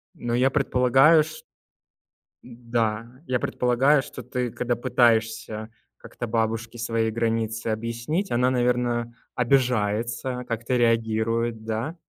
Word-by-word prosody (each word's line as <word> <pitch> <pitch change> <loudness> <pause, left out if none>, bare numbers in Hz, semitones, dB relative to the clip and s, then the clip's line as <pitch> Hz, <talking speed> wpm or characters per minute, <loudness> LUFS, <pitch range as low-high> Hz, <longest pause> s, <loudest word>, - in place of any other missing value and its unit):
Но 120 0 -2
я 130 +2 +3
предполагаю, 135 +3 +4
ш 155 0 -10 1.0
Н-да, 115 -2 -2 0.2
я 125 -1 0
предполагаю, 130 +5 +2
что 130 - -9
ты, 125 0 -3
когда 120 +1 -1
пытаешься 110 -3 +1 0.3
как-то - - -7
бабушке 115 +1 -2
свои 115 -1 0
границы 115 -1 -1
объяснить, 115 - -2
она 125 +2 +2
наверно, 120 -1 0 0.2
обижается, 125 -1 0
как-то 115 +2 -2
реагирует, 115 -1 +1
да? 115 +8 -3
120 Hz, 110 wpm, -25 LUFS, 115-125 Hz, 1.0 s, предполагаю